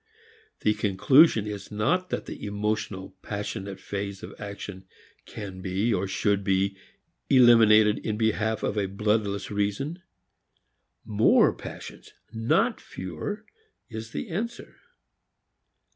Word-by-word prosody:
The 105 - +3
conclusion 105 - +4
is 105 -2 -6
not 170 - 0
that - - -3
the - - -8
emotional, 105 -2 -3
passionate 100 -1 -5
phase 100 -1 -5
of - - -8
action 100 -2 -7 0.4
can 95 -3 -7
be 95 +5 0
or 95 0 0
should 100 +1 0
be 95 0 +1 0.5
eliminated 110 -4 +6
in 105 -1 -3
behalf 110 0 0
of 105 - 0
a 100 - 0
bloodless 100 0 -1
reason. 105 - -2 1.0
More 110 0 +4
"passions," - - -10 0.2
not 115 +1 +1
fewer, 95 - -6 0.4
is 110 -1 -7
the 215 - -5
answer. 230 +7 -5
105 Hz, 115 wpm, -26 LUFS, 100-110 Hz, 1.0 s, eliminated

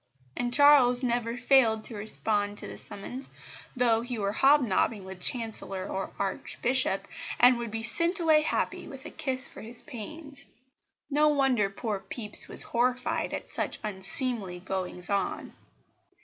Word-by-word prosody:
And 245 0 -2
Charles 265 -2 +6
never 240 -1 -1
failed 245 -4 +3
to 230 - -6
respond 205 -1 -2
to - - -3
the - - -6
summons, 250 +7 -6 0.5
though 235 -3 +2
he 245 0 -5
were 200 -2 -1
hobnobbing 235 -6 +2
with 190 -1 -9
chancellor 220 -4 -1
or 190 0 -4
archbishop, 200 +2 -1 0.3
and 245 0 +6
would 235 -1 -4
be 225 +1 -5
sent 335 +10 +3
away 315 -2 +4
happy, 305 - -2
with - - -11
a - - -7
kiss 260 -2 -2
for - - -12
his 230 +2 -8
pains. 285 +2 -7 0.6
No 300 +2 +4
wonder 270 -8 +2
poor 205 0 -4
Pepys 210 +1 +1
was - - +5
horrified 250 +1 -1
at - - -5
such - - -2
unseemly 200 -1 -2
goings 180 -1 -3
on. 200 -1 -2
235 Hz, 150 wpm, -28 LUFS, 205-260 Hz, 0.6 s, Charles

